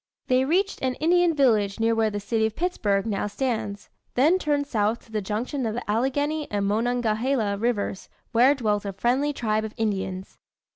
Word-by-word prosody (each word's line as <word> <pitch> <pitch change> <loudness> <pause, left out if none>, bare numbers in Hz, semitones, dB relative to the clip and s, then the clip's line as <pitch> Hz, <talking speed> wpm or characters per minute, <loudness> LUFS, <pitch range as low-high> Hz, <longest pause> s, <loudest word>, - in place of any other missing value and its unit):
They 255 +1 +3
reached 380 +7 0
an 255 -1 0
Indian 345 +1 +3
village 220 -7 +2
near 225 0 +2
where 225 -1 +2
the 205 -1 -4
city 220 +2 0
of 220 - -8
Pittsburgh 210 - 0
now 210 -2 -1
stands, 215 -2 -3 0.2
then 310 +9 +4
turned 290 -4 0
south 220 -4 -1
to 225 - -20
the 215 -1 -1
junction 230 +8 -3
of 220 - -3
the 245 - -5
Allegheny 285 +7 0
and 205 -1 -1
Monongahela 225 +1 0
rivers 210 -3 -2 0.2
where 250 +5 +5
dwelt 210 -6 0
a 200 -1 -4
friendly 250 +9 +1
tribe 220 -5 -1
of 220 0 -6
Indians. 190 -3 -3
230 Hz, 180 wpm, -25 LUFS, 210-270 Hz, 0.2 s, where